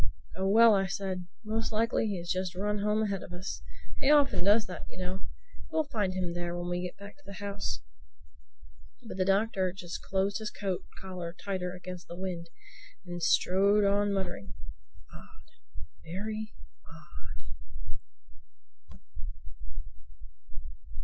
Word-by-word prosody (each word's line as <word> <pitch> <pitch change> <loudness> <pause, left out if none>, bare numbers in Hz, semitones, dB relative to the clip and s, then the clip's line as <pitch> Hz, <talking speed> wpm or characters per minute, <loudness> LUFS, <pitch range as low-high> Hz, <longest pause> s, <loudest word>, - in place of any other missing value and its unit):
"Oh 190 +2 +1
well," 225 +3 +8
I 195 -1 +3
said, 190 -2 -2 0.2
"most 225 +2 0
likely 225 +1 +3
he 200 -3 0
has 175 0 -6
just 185 -1 0
run 205 +2 +1
home 210 +1 +3
ahead 200 -3 0
of - - -8
us. 180 +2 -4 0.4
He 270 - +3
often 290 -8 +6
does 210 +3 +6
that, 185 - -6
you - - -11
know. 185 +1 -3 0.4
We'll 315 - +3
find 210 -10 0
him 180 -2 0
there 175 0 -2
when 175 0 -2
we 175 0 +1
get 180 -1 -4
back 200 +4 -10
to 290 - -23
the 200 - -8
house." 200 - -2 1.3
But 205 - -5
the 185 - +3
Doctor 195 -1 +3
just 175 -2 -6
closed 195 +1 +1
his 215 -1 -2
coat 195 -3 -2
collar 180 -3 -5
tighter 185 -2 -1
against 180 -1 -7
the 170 - -7
wind 180 -3 -3 0.6
and 175 -1 -5
strode 200 +5 +5
on 200 +1 +4
muttering, 190 - -2 0.6
"Odd—very 205 - -7 0.4
odd!" 90 - -11
190 Hz, 140 wpm, -31 LUFS, 180-205 Hz, 1.3 s, well